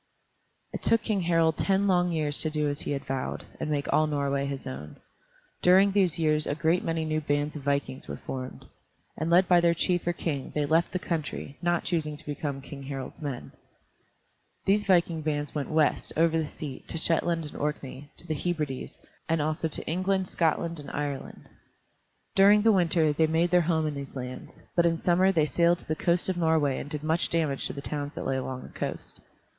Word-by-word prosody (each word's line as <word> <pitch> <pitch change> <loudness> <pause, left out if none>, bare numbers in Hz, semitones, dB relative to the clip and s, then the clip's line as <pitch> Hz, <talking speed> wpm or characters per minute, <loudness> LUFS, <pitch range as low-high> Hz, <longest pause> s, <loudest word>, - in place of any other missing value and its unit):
It - - -4
took 230 -1 +2
King 210 -4 0
Harald 165 -2 +2
ten 195 0 +2
long 180 -2 +3
years 150 -3 +1
to 155 - 0
do 150 -1 0
as 145 0 -2
he - - -4
had 140 - -4
vowed, 135 -1 -3
and - - -3
make 145 -2 -1
all 155 - +4
Norway 140 -2 0
his 140 -1 -5
own. 75 +3 -7 0.7
During 190 +2 +6
these 190 -5 +2
years 155 -2 +1
a 145 - -1
great 165 +3 +1
many 165 -1 -1
new 155 0 -1
bands 145 0 -1
of 150 - -5
vikings 140 -1 -2
were - - -5
formed, 130 -1 -6 0.5
and 160 +2 -2
led 180 +2 +5
by 175 -1 +5
their 170 0 +3
chief 175 0 0
or 175 - +2
king 145 -5 -3
they 150 -1 +1
left 165 +3 +2
the - - -1
country, 160 -5 -4
not 175 -1 +1
choosing 155 -4 -1
to - - -15
become 145 -2 -4
King 140 0 -9
Harald's 135 +2 -6
men. 140 -5 -5 1.1
These 205 +1 +3
viking 170 -3 +3
bands 150 -1 -2
went 145 -2 -3
west, 155 -1 +2
over 165 0 +3
the 160 -2 0
sea, 145 -3 -7
to - - -4
Shetland 165 0 +1
and 150 - -9
Orkney, 145 -1 -4
to - - -7
the 155 - -2
Hebrides, 150 -5 -3 0.3
and 165 0 +2
also 155 +2 0
to 155 - -5
England, 185 +3 0
Scotland, 165 0 0
and 145 - -8
Ireland. 145 -2 -5 0.9
During 205 +2 +6
the 225 - +6
winter 165 -5 +3
they 160 +2 +3
made 165 +2 +1
their 180 0 +5
home 160 -1 +1
in 150 - -1
these 140 -1 -7
lands, 125 -1 -8
but 170 -1 +4
in 165 -1 +1
summer 185 +3 +3
they 160 -5 +3
sailed 170 +3 +3
to - - -10
the 155 - 0
coast 170 +2 +2
of 185 -2 0
Norway 160 -5 +2
and 145 - -7
did 150 0 -4
much 160 +2 +1
damage 155 -5 0
to - - -2
the 140 - -6
towns 145 0 -4
that - - -5
lay 135 - 0
along 130 0 -4
the - - -10
coast. - - -5
155 Hz, 210 wpm, -28 LUFS, 145-170 Hz, 1.1 s, During